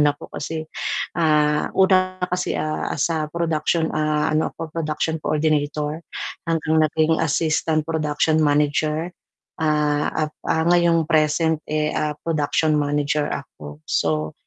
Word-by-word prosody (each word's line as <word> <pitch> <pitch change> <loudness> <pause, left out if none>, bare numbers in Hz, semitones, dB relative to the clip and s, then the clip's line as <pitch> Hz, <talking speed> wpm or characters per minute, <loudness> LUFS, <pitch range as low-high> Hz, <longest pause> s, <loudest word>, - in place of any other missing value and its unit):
naman 150 - +5
ako - - -12
kasi 160 +2 -4 0.5
ah, 150 -2 +3
una 185 -1 +3
kasi, 180 - -1
ah, 155 0 -2
sa 155 +1 0
production, 160 0 0
ah, 155 0 +1
ano 155 +1 0
ako, 160 -1 -6
production 160 0 -2
coordinator 150 0 0 0.5
hanggang 160 -1 +1
naging 160 +1 +1
assistant 155 0 +1
production 155 0 0
manager. 150 +3 +1 0.5
Ah, 150 -1 +1 0.2
up 150 - -12 0.2
ah, 160 0 +2
ngayong 170 -2 +4
present, 155 0 +2
eh, 155 0 0
ah, 150 -1 -1
production 155 -1 +1
manager 145 0 0
ako. 75 - -7
So 75 -1 0
155 Hz, 125 wpm, -22 LUFS, 150-160 Hz, 0.5 s, naman